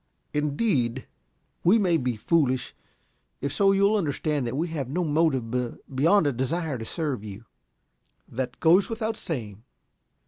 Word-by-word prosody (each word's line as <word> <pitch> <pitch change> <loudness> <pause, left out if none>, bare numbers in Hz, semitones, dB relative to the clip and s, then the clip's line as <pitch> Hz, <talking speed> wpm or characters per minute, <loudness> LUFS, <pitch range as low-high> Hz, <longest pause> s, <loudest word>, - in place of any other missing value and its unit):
"Indeed?" 145 - 0 0.6
"We 190 +6 +5
may 180 -6 +3
be 125 -4 -1
foolish. 130 +1 +1 0.7
If 140 0 -3
so, 195 -1 +4
you 195 0 +2
will 210 +2 +4
understand 150 -5 -1
that 125 +3 -3
we 165 +3 -1
have 145 -6 -4
no 175 +6 -1
motive 145 -7 +1 0.4
beyond 165 +7 +4
a 145 - +3
desire 140 +2 -2
to 115 - -6
serve 145 - -3
you." 105 +2 -9 0.8
"That 125 0 -4
goes 180 +7 +4
without 225 -1 -2
saying." 110 - -5
150 Hz, 145 wpm, -26 LUFS, 125-175 Hz, 0.8 s, We